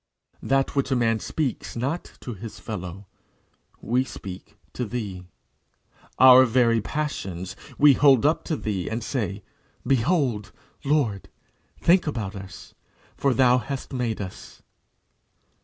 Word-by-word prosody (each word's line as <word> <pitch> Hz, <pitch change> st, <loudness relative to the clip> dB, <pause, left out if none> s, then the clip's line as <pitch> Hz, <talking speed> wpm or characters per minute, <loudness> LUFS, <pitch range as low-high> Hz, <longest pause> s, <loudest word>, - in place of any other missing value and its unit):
That 135 Hz, +1 st, 0 dB
which 140 Hz, -1 st, +1 dB
a 135 Hz, -, +2 dB
man 115 Hz, -2 st, +2 dB
speaks 145 Hz, 0 st, -3 dB
not 135 Hz, +9 st, -3 dB
to 125 Hz, -, -6 dB
his 110 Hz, +2 st, -9 dB
fellow, 95 Hz, -2 st, -7 dB, 0.8 s
we 125 Hz, +3 st, +1 dB
speak 100 Hz, -5 st, -10 dB, 0.2 s
to 125 Hz, -, -3 dB
thee. 100 Hz, -6 st, -5 dB, 0.9 s
Our 130 Hz, 0 st, +9 dB
very 115 Hz, -2 st, +3 dB
passions 95 Hz, -, -4 dB, 0.2 s
we 145 Hz, -1 st, +7 dB
hold 135 Hz, -2 st, +5 dB
up 155 Hz, +2 st, +2 dB
to 160 Hz, -, -1 dB
thee, 100 Hz, -9 st, -3 dB
and 110 Hz, +1 st, -3 dB
say, 105 Hz, -8 st, -3 dB, 0.4 s
"Behold, 130 Hz, -, +1 dB, 0.3 s
Lord! 135 Hz, -9 st, 0 dB, 0.5 s
Think 180 Hz, 0 st, +4 dB
about 110 Hz, -9 st, -3 dB
us; 95 Hz, -1 st, -10 dB, 0.4 s
for 140 Hz, -, +1 dB
thus 120 Hz, -, -2 dB
thou 125 Hz, -1 st, +5 dB
hast 135 Hz, +4 st, -6 dB
made 120 Hz, -4 st, -2 dB
us." 95 Hz, -2 st, -9 dB
120 Hz, 130 wpm, -25 LUFS, 105-135 Hz, 0.9 s, Our